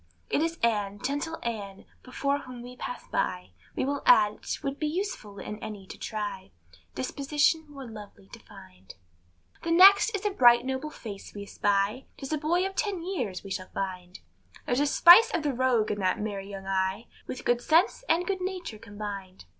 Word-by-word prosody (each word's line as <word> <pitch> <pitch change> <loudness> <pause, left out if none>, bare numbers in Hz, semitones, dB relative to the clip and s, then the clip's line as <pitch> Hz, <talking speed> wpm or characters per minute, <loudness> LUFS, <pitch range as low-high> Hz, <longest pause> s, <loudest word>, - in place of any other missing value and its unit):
It - - +2
is 330 +1 -1
Ann, 205 -3 +1
gentle 290 +7 -3
Ann, 205 -4 -5 0.2
before 280 +2 -1
whom 250 -3 -10
we 250 +1 -10
pass 245 - -7
by, 90 0 -2 0.2
We - - 0
will 280 +1 -2
add 210 -1 +5
't - - -4
would 275 0 -3
be 305 - 0
useless 300 - -4
in 210 - -6
any 210 -3 -7
to - - -9
try 205 -3 -5 0.5
Disposition 295 - 0
more 275 -2 -9
lovely 210 - -11
to - - -11
find. 95 0 -15 0.7
The 335 - -4
next 390 +6 +7
is 405 - -5
a 415 - +2
bright 240 -8 +6
noble 265 +3 -3
face 210 -10 -9
we 205 - -6
espy, 205 +5 0
'Tis 270 +3 -5
a 305 - 0
boy 345 +5 +1
of 385 - -3
ten 390 -5 -1
years 250 - -3
we 195 - -9
shall 185 -1 -4
find; 180 -2 -5 0.5
There's 245 - 0
a 290 - +2
spice 350 +9 +8
of 335 - -1
the 290 -2 0
rogue 245 -3 +2
in 205 - -3
that 185 -1 +1
merry 200 -2 -4
young 195 -1 -8
eye, 190 +3 -1 0.2
With 255 - -6
good 240 0 +2
sense 335 - +3
and 335 +2 +3
good 380 0 -2
nature 365 - -5
combined. 200 - -8
240 Hz, 190 wpm, -28 LUFS, 200-310 Hz, 0.7 s, spice